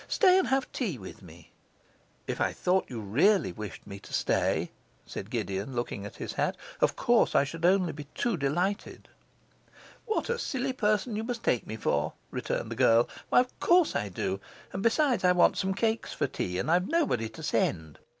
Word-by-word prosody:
Stay 375 Hz, -2 st, +5 dB
and 375 Hz, -, +1 dB
have 265 Hz, 0 st, 0 dB
tea 205 Hz, -, -2 dB
with 95 Hz, -4 st, -10 dB
me.' 85 Hz, -2 st, -15 dB, 0.7 s
'If -, -, -3 dB
I -, -, +1 dB
thought 185 Hz, +1 st, +1 dB
you 120 Hz, -, -5 dB
really 140 Hz, -, +3 dB
wished 105 Hz, -1 st, -8 dB
me 100 Hz, -1 st, -8 dB
to -, -, -14 dB
stay,' -, -, +1 dB, 0.3 s
said -, -, -7 dB
Gideon, 100 Hz, +7 st, -3 dB
looking 105 Hz, -4 st, -3 dB
at -, -, -12 dB
his -, -, -5 dB
hat, -, -, -1 dB, 0.2 s
'of -, -, +2 dB
course -, -, +3 dB
I 140 Hz, -, +6 dB
should 165 Hz, +4 st, -4 dB
only 185 Hz, -1 st, +4 dB
be 150 Hz, 0 st, -8 dB
too 240 Hz, -4 st, 0 dB
delighted.' 175 Hz, +7 st, -2 dB, 1.0 s
'What 440 Hz, -, 0 dB
a 475 Hz, 0 st, -1 dB
silly 265 Hz, -, -2 dB
person 215 Hz, -2 st, 0 dB
you 220 Hz, -, -2 dB
must 235 Hz, 0 st, -4 dB
take 120 Hz, -, +1 dB
me 110 Hz, -, -5 dB
for!' 110 Hz, -, 0 dB, 0.2 s
returned -, -, -3 dB
the -, -, -3 dB
girl. 115 Hz, +1 st, +4 dB, 0.2 s
'Why, -, -, +6 dB
of 250 Hz, -, -7 dB
course 350 Hz, -2 st, +4 dB
I 105 Hz, -, -1 dB
do; 95 Hz, +1 st, -2 dB, 0.3 s
and, 190 Hz, -, -3 dB
besides, 250 Hz, +3 st, +2 dB
I 180 Hz, 0 st, +5 dB
want 180 Hz, -, +4 dB
some 190 Hz, 0 st, -1 dB
cakes 225 Hz, +2 st, -1 dB
for 145 Hz, -, 0 dB
tea, 90 Hz, -9 st, -3 dB
and 125 Hz, -, -1 dB
I've 180 Hz, +2 st, +3 dB
nobody 280 Hz, -, +1 dB
to -, -, -11 dB
send. 80 Hz, -2 st, -1 dB
180 Hz, 195 wpm, -29 LUFS, -, 1.0 s, I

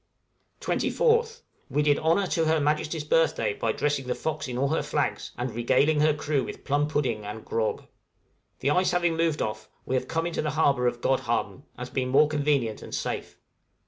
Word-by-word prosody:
{INTERCHANGE -, -, -1 dB
OF -, -, -2 dB
PRESENTS.} 460 Hz, -1 st, +3 dB
24th. -, -, -27 dB, 0.3 s
We 150 Hz, -, +3 dB
did 145 Hz, -1 st, +3 dB
honor 165 Hz, +5 st, +2 dB
to 165 Hz, -3 st, 0 dB
Her 160 Hz, 0 st, +3 dB
Majesty's 150 Hz, +2 st, 0 dB
birthday 150 Hz, -9 st, +2 dB
by 115 Hz, +2 st, -1 dB
dressing 145 Hz, +1 st, -1 dB
the 125 Hz, -, -1 dB
'Fox' 155 Hz, -2 st, -3 dB
in 125 Hz, -1 st, -4 dB
all 135 Hz, +2 st, +1 dB
her 160 Hz, -, +1 dB
flags, -, -, -2 dB
and 125 Hz, 0 st, -3 dB
regaling 135 Hz, +6 st, +2 dB
her 155 Hz, +1 st, +4 dB
crew 145 Hz, -2 st, -1 dB
with -, -, -8 dB
plum 145 Hz, +1 st, +1 dB
pudding 130 Hz, -8 st, -1 dB
and 105 Hz, +2 st, -7 dB
grog. 110 Hz, -1 st, -1 dB, 0.8 s
The 140 Hz, -, +2 dB
ice 180 Hz, +4 st, +3 dB
having 175 Hz, -2 st, +1 dB
moved 165 Hz, -2 st, +1 dB
off, 110 Hz, 0 st, -5 dB, 0.2 s
we -, -, -3 dB
have 130 Hz, -, 0 dB
come 165 Hz, 0 st, -1 dB
into 170 Hz, -, -2 dB
the 150 Hz, -, -1 dB
harbor 135 Hz, -5 st, +3 dB
of 120 Hz, 0 st, -2 dB
Godhavn, 130 Hz, +1 st, -1 dB
as 125 Hz, 0 st, -7 dB
being 130 Hz, -1 st, -1 dB
more 140 Hz, +3 st, +5 dB
convenient 145 Hz, -7 st, 0 dB
and -, -, -6 dB
safe. -, -, -4 dB
145 Hz, 205 wpm, -26 LUFS, 125-160 Hz, 0.8 s, more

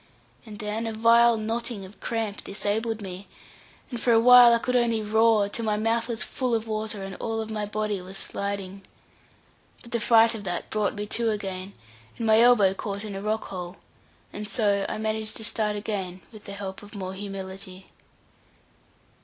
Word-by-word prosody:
And 210 Hz, -1 st, -9 dB
then 215 Hz, +1 st, -3 dB
a 225 Hz, -, -3 dB
vile 230 Hz, +1 st, +5 dB
knotting 225 Hz, -1 st, -2 dB
of 190 Hz, +3 st, -15 dB
cramp 225 Hz, -3 st, -3 dB
disabled 215 Hz, +2 st, -2 dB
me, 190 Hz, +1 st, -7 dB, 0.6 s
and 240 Hz, -2 st, -4 dB
for 245 Hz, -, +2 dB
awhile 240 Hz, +1 st, +8 dB
I 235 Hz, -, +5 dB
could 250 Hz, +2 st, -2 dB
only 230 Hz, -3 st, +2 dB
roar, 220 Hz, -1 st, +3 dB
till 230 Hz, +3 st, -5 dB
my 210 Hz, -1 st, +1 dB
mouth 230 Hz, +2 st, 0 dB
was 230 Hz, -2 st, -2 dB
full 255 Hz, -4 st, -1 dB
of 225 Hz, 0 st, -3 dB
water, 215 Hz, -2 st, -3 dB
and 195 Hz, 0 st, -6 dB
all 225 Hz, -1 st, -3 dB
of 220 Hz, 0 st, -4 dB
my 210 Hz, -1 st, -2 dB
body 210 Hz, -2 st, -2 dB
was 190 Hz, +2 st, -8 dB
sliding. 200 Hz, -1 st, -4 dB, 1.0 s
But 235 Hz, -, -13 dB
the 235 Hz, -, 0 dB
fright 225 Hz, +1 st, +5 dB
of 220 Hz, -3 st, -6 dB
that 175 Hz, -3 st, -4 dB
brought 215 Hz, -1 st, 0 dB
me 205 Hz, 0 st, -4 dB
to 230 Hz, +2 st, 0 dB
again, 195 Hz, -2 st, -4 dB, 0.4 s
and 230 Hz, -, -3 dB
my 220 Hz, 0 st, +5 dB
elbow 225 Hz, -6 st, +6 dB
caught 200 Hz, +1 st, -5 dB
in 210 Hz, -, -6 dB
a 195 Hz, -, -5 dB
rock 215 Hz, +2 st, -2 dB
hole; 180 Hz, -1 st, -6 dB, 0.6 s
and 210 Hz, -, -5 dB
so 200 Hz, -1 st, +1 dB
I -, -, -3 dB
managed 220 Hz, 0 st, -2 dB
to 220 Hz, -, -7 dB
start 215 Hz, -1 st, 0 dB
again, 195 Hz, -3 st, -4 dB
with 215 Hz, -2 st, -13 dB
the 200 Hz, -, -7 dB
help 195 Hz, -1 st, -6 dB
of 205 Hz, +1 st, -12 dB
more 190 Hz, -1 st, -5 dB
humility. 190 Hz, -1 st, -8 dB
215 Hz, 185 wpm, -26 LUFS, 200-225 Hz, 1.0 s, awhile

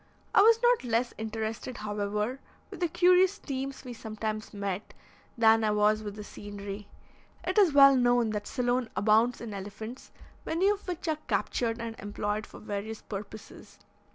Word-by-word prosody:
I -, -, +7 dB
was 455 Hz, +2 st, +6 dB
not 485 Hz, -, +4 dB
less 240 Hz, 0 st, 0 dB
interested, 220 Hz, +2 st, -4 dB
however, 210 Hz, +4 st, -2 dB, 0.3 s
with -, -, -8 dB
the 350 Hz, -, +1 dB
curious 365 Hz, +3 st, +4 dB
teams 270 Hz, -1 st, -5 dB
we 250 Hz, -, -6 dB
sometimes 215 Hz, -1 st, -5 dB
met, 200 Hz, -1 st, -4 dB, 0.4 s
than 225 Hz, -1 st, +5 dB
I 215 Hz, -, +2 dB
was 210 Hz, +1 st, +3 dB
with 205 Hz, -1 st, -6 dB
the 210 Hz, -, -7 dB
scenery. 205 Hz, 0 st, -8 dB, 0.6 s
It -, -, +1 dB
is 380 Hz, -6 st, +5 dB
well 275 Hz, -1 st, +8 dB
known 245 Hz, -3 st, +3 dB
that 210 Hz, -1 st, -4 dB
Ceylon 245 Hz, -2 st, 0 dB
abounds 220 Hz, +3 st, +3 dB
in 230 Hz, -3 st, -6 dB
elephants, 210 Hz, +5 st, -8 dB, 0.3 s
many 360 Hz, +5 st, +1 dB
of 410 Hz, -1 st, -2 dB
which 355 Hz, -1 st, -4 dB
are 310 Hz, -1 st, 0 dB
captured 230 Hz, -1 st, -1 dB
and 230 Hz, -1 st, -5 dB
employed 205 Hz, +1 st, -3 dB
for -, -, -13 dB
various 215 Hz, +1 st, -5 dB
purposes. 205 Hz, +1 st, -9 dB
225 Hz, 160 wpm, -29 LUFS, 210-260 Hz, 0.6 s, well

